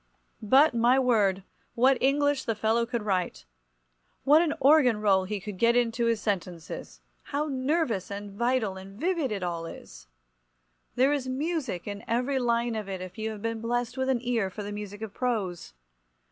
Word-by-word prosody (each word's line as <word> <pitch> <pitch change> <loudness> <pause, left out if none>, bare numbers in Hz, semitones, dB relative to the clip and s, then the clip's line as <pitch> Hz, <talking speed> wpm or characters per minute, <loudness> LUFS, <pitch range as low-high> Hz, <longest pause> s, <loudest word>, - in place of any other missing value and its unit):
But, 265 +8 +5
my 240 +2 +4
word, 210 -7 +2 0.3
what 260 +2 +4
English 285 +1 +2
the 225 - -1
fellow 225 +2 +1
could 235 -2 -3
write! 185 - -2 0.8
What 295 +4 +6
an 325 -3 0
organ 270 -6 +5
roll 195 -3 +3
he 205 +1 -3
could 195 -1 -8
get 235 0 +4
into 235 -1 +1
his 230 -2 +1
sentences! 180 -5 -4 0.2
How 290 +2 -2
nervous 270 - -1
and 200 0 -6
vital 225 -2 0
and 195 +2 -11
vivid 330 -5 0
it 200 -3 -3
all 170 -2 -3
is! - - -11 0.9
There 265 +3 +3
is 275 -3 -2
music 275 - -2
in 205 +1 -6
every 250 +3 0
line 235 -1 +1
of 215 -3 -4
it 190 -1 -4
if 185 +3 -9
you 220 0 -2
have 215 -1 -8
been 230 -1 -2
blessed 240 +1 -2
with 260 0 -1
an 250 -3 +1
ear 235 -5 0
for 210 +3 -7
the 205 - -5
music 205 0 -7
of 215 -2 -6
prose. 210 - -2
230 Hz, 180 wpm, -27 LUFS, 200-260 Hz, 0.9 s, What